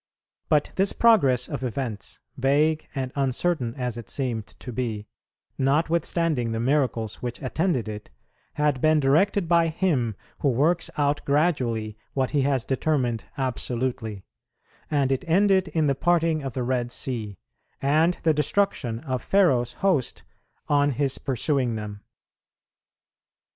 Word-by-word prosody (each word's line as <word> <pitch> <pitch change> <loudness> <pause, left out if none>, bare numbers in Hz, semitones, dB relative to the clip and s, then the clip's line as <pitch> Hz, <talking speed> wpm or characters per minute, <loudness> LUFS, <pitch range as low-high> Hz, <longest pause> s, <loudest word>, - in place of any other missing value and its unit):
But 150 -1 +2
this 195 +1 +2
progress 140 - +4
of 130 - -5
events, 120 -5 -4 0.2
vague 150 +4 +2
and 130 -2 -2
uncertain 135 -1 0
as 125 -3 -3
it 115 - -8
seemed 120 -6 -2
to 125 - -10
be, 110 -4 -3 0.5
notwithstanding 155 -2 +1
the 115 - -2
miracles 120 -4 0
which 120 -1 -4
attended 145 - -1
it, 105 -1 -7 0.5
had 150 -3 +1
been 155 0 +4
directed 170 +7 +2
by 170 0 +4
Him 155 - 0 0.2
who 140 - +2
works 155 +7 +2
out 145 0 +1
gradually 125 -8 0 0.2
what 130 -2 0
He 145 - +2
has 135 -3 +1
determined 130 -4 0
absolutely; 125 -5 -2 0.7
and 140 -3 +1
it 135 - 0
ended 190 +2 +3
in 155 0 0
the 140 - +3
parting 165 +1 +1
of 135 -3 -5
the 130 - -1
Red 120 -1 -1
Sea, 110 -8 -3 0.4
and 155 +5 +3
the 160 - +4
destruction 150 - 0
of 130 -4 -3
Pharaoh's 130 -12 +2
host, 160 -11 +1 0.4
on 145 -1 +3
his 135 +1 -1
pursuing 130 -2 0
them. 105 -1 -6
135 Hz, 135 wpm, -25 LUFS, 120-155 Hz, 0.7 s, progress